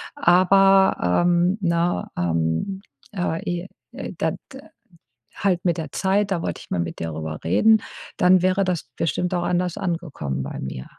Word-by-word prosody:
Aber, 190 - +4
ähm, 175 +2 +2
ne, 170 -2 0
ähm, 85 - -1 0.3
äh, 175 -4 -2
e 175 +1 -3 0.5
da - - 0
d - - -7 1.0
halt 185 -3 0
mit 175 -2 +1
der 160 - -5
Zeit, 200 +1 +1
da 175 -4 -1
wollte - - -4
ich - - -19
mal 90 - -1
mit 85 -1 -4
dir 85 - -3
darüber 80 -1 -5
reden.“ 200 - +4 0.4
Dann 180 0 +4
wäre 185 +1 +2
das 180 -3 -2
bestimmt 175 +3 -1
auch 175 -1 0
anders 180 -1 -1
angekommen 165 - -3
bei 70 - -6
mir. 65 -1 -6
175 Hz, 160 wpm, -23 LUFS, -, 1.0 s, Aber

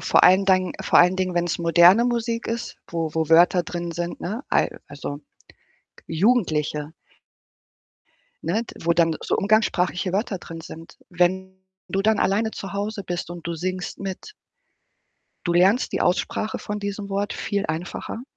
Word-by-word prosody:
vor - - +4
allen 185 +2 +6
Dingen 185 -2 +3
vor - - +4
allen 180 +1 +5
Dingen, 185 -1 -1
wenn's 175 -1 0
moderne 175 +6 +6
Musik 235 -1 -1
ist, 235 +1 -4
wo 165 -2 -2
wo 160 -1 0
Wörter 175 +2 +5
drin 170 0 -5
sind, 175 +1 -4
ne? 215 +9 -4
Ei - - +2 0.2
also, 145 0 -6 0.9
jugendliche 160 -6 +1 1.5
ne? 195 +8 0
D - - -11
wo 170 - +4
dann 165 -2 +2
so - - 0
umgangssprachliche 195 -3 +1
Wörter 200 0 -1
drin 165 -1 -9
sind. 165 0 -11
Wenn 190 +2 0 0.3
du 195 - -1
dann 215 0 +3
alleine 215 +3 +1
zu 195 -2 -7
Hause 205 0 -3
bist 175 -1 -4
und 175 -1 -8
du 170 - -3
singst 185 +1 -4
mit 195 - -6 1.1
du 175 - +1
lernst 190 +7 +3
die - - -1
Aussprache 215 +4 0
von 210 0 -5
diesem 200 0 -5
Wort 200 +1 -2
viel 200 0 -2
einfacher. 170 +8 -5
185 Hz, 155 wpm, -23 LUFS, 170-205 Hz, 1.5 s, allen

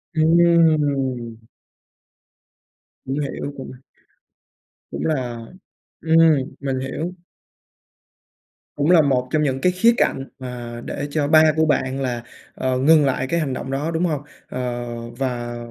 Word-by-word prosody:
Ừm. 150 -8 +2 1.6
Cũng 135 +2 -2
hiểu, 145 0 -4
cũng 130 - -8 1.2
cũng - - -4
là 125 -7 -2 0.6
ừm, 160 0 +3 0.4
mình 135 -2 -2
hiểu. 155 +7 -4 1.6
Cũng 145 +4 +2
là 175 -3 +7
một 130 -3 +1
trong 155 -1 +2
những 135 -2 -1
cái 180 - +3
khía 230 +6 +4
cạnh 135 0 0
mà 120 -2 -7
để 145 - -4
cho 150 -2 0
ba 155 +1 +6
của 160 0 +3
bạn 135 -3 0
là, 120 -3 -2 0.3
ờ, 130 -1 -1
ngừng 150 +3 +5
lại 130 -1 0
cái 170 - +1
hành 145 -5 -2
động 130 +1 -5
đó, 145 +4 -2
đúng 165 +2 0
hông? 150 -5 -1 0.3
Ờ, 120 -1 -3 0.3
và 120 -2 -3
135 Hz, 135 wpm, -21 LUFS, 125-155 Hz, 1.6 s, là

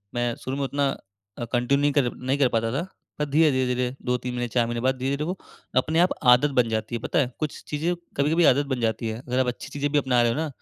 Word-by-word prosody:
मैं 120 -1 0
शुरू 135 +2 -3
में 140 - -1
उतना 140 0 0 0.5
अ, 120 - -2
कंटिन्यू 140 +4 +2
कर 130 -4 +2
नहीं 130 +2 -1
कर 135 - +5
पाता 115 0 0
था। 150 +5 -1 0.4
पर 150 - +1
धीरे, 155 +2 +4
धीरे, 130 -1 +1
धीरे 125 +1 -1
2-3 125 0 -1
महीने, 120 0 -2
4 120 0 +2
महीने 120 0 -3
बाद 130 +1 +2
धीरे-धीरे 135 +2 -1
तो 150 - -1
वो 185 +1 -3 0.4
अपने 160 +5 +2
आप 180 - +5 0.2
आदत 145 +4 +3
बन 115 - +3
जाती 110 +2 -2
है 115 - -4
पता - - 0
है। 130 -2 +1
कुछ 155 -2 -4
चीज़ें 160 +4 -1 0.2
कभी-कभी 160 +4 +3
आदत 140 +3 +1
बन 130 - -2
जाती 110 0 -1
है। 110 0 -4
अगर 125 +1 0
आप 130 - +2
अच्छी 125 - -4
चीज़ें 145 0 -2
भी 150 - +2
अपना 125 -3 +2
रहे 120 -1 +3
हो 120 - -3
ना 160 - -1
130 Hz, 265 wpm, -25 LUFS, 120-145 Hz, 0.5 s, कर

